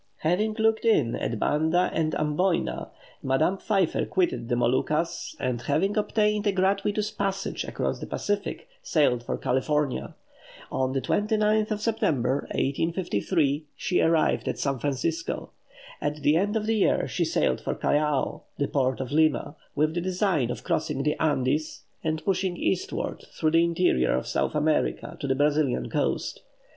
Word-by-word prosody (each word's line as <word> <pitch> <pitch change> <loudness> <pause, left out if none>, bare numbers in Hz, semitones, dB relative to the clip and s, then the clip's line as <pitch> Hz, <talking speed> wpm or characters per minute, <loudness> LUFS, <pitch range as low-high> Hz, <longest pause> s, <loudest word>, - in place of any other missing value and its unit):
Having 205 +7 +1
"looked 220 0 +2
in" 150 - +3
at 115 - -2
Banda 160 - +2
and 155 -1 0
Amboyna, 160 +4 0 0.3
Madame 155 +8 +1
Pfeiffer 195 -6 +1
quitted 175 -10 0
the 120 - +2
Moluccas, 130 +8 0
and 125 -3 -1
having 160 +10 +1
obtained 210 0 +1
a - - +4
gratuitous 200 +2 +1
passage 195 0 -2
across - - -2
the - - -6
Pacific, 205 - -3
sailed 140 -6 +2
for 120 - -3
California. 140 +2 -1 0.6
On 130 0 0
the 135 - 0
29th 215 - +1
of 210 -1 -2
September, 145 - 0
1853, 160 0 0
she 180 - 0
arrived 165 -1 +2
at - - -1
San 140 -2 -1
Francisco. 145 +5 -2 0.5
At 145 0 -1
the 150 - +4
end 205 +5 +1
of 215 -1 0
the 225 0 +1
year 200 - +2
she - - -1
sailed - - +1
for - - -2
Callao, 150 -1 0 0.2
the 140 - 0
port 130 -2 0
of 130 - -5
Lima, 155 -1 +2 0.2
with 155 +2 +2
the 175 - -1
design 185 - +1
of 120 - -5
crossing 135 - -1
the 150 - +1
Andes, 150 0 0 0.2
and 155 0 -2
pushing 185 -2 0
eastward, 185 - -2
through 155 -1 0
the 165 +1 +5
interior 170 - +2
of 65 - -2
South - - -1
America, 150 +1 0
to 140 - -3
the 130 - +1
Brazilian 145 -1 +1
coast. - - -1
160 Hz, 155 wpm, -26 LUFS, 140-195 Hz, 0.6 s, the